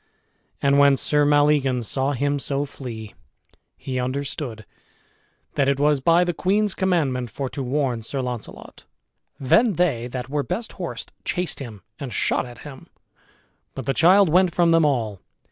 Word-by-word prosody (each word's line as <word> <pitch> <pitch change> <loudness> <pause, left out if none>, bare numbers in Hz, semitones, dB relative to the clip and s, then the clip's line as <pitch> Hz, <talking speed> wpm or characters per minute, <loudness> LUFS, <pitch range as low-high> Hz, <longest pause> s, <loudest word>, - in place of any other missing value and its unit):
And 140 0 +4
when 140 -1 +5
Sir 150 +1 +2
Maleagans 145 -5 +2
saw 135 +4 0
him 145 +2 0
so 140 +1 -1
flee, 115 -7 -8 0.6
he 130 -1 -4
understood 130 -3 -4 0.9
that 140 -2 +2
it 140 0 0
was 145 -1 +3
by 165 +5 +4
the 175 -1 -1
queen's 200 +4 +1
commandment 145 -10 0
for 135 +4 -4
to 140 - -6
warn 130 -2 -1
Sir 135 +5 -4
Launcelot. 125 -3 -7 0.5
Then 210 - +3
they 150 -10 0
that 125 0 -5
were 145 +2 -1
best 185 +10 -4
horsed - - -7
chased 180 -3 -1
him, 110 -8 -9 0.2
and 135 -3 -6
shot 110 - 0
at 120 - -12
him, 135 -3 -11 0.9
but 135 - -6
the 135 - 0
child 185 +6 +5
went 180 +2 +3
from 170 -1 +3
them 165 -1 +4
all. 115 -9 0
140 Hz, 160 wpm, -23 LUFS, 125-155 Hz, 0.9 s, when